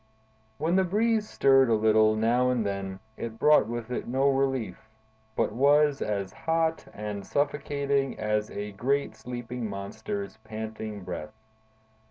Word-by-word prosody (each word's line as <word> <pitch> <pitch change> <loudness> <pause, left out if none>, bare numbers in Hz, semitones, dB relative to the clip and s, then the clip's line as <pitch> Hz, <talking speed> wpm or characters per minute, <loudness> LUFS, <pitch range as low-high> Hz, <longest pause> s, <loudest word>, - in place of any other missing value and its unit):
When 165 +5 +1
the 190 - +4
breeze 215 +3 +1
stirred 135 -2 +4
a 115 - +4
little 110 0 +4
now 120 +3 +2
and 120 -4 +1
then, 100 -1 -4 0.2
it 115 -1 -5
brought 150 -2 +5
with 120 0 -5
it 125 - -3
no 135 +3 +2
relief, 130 -6 -1 0.5
but 115 - +1
was 145 +4 +3
as 100 -3 -2
hot 160 0 0
and 105 -1 -5
suffocating 140 0 -1
as 105 0 -1
a 105 +1 -5
great 130 +4 -1
sleeping 120 0 -5
monster's 110 - -5
panting 110 -2 -6
breath. 90 -1 -6
120 Hz, 140 wpm, -28 LUFS, 105-140 Hz, 0.5 s, brought